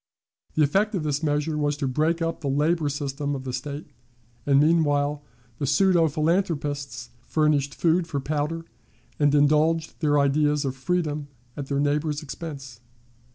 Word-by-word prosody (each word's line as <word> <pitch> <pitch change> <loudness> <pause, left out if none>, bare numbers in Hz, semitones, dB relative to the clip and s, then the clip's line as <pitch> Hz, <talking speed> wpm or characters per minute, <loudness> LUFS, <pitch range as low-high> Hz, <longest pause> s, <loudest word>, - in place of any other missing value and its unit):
The 155 - +4
effect 200 +9 +1
of 175 - -2
this 145 -1 -1
measure 150 0 0
was 145 -1 0
to 140 -2 -1
break 160 +6 +1
up 165 0 -3
the 145 - -3
labor 150 +2 +1
system 145 0 -3
of 130 - -6
the 130 -1 -5
State, 140 +4 -6 0.6
and 140 -1 +5
meanwhile 145 -2 +2 0.4
the 140 - -1
pseudo 170 +2 +4
philanthropists 145 -6 -1 0.2
furnished 150 -3 +1
food 170 +1 +2
for 145 -4 -2
powder, 150 +4 -2 0.5
and 145 -1 +3
indulged 155 +3 +2
their 145 -2 +2
ideas 145 +1 +2
of 135 -1 -2
freedom 150 +1 -2 0.3
at 140 -2 -5
their 140 0 -1
neighbors' 150 +1 0
expense. 135 -4 -8
150 Hz, 155 wpm, -25 LUFS, 140-160 Hz, 0.6 s, and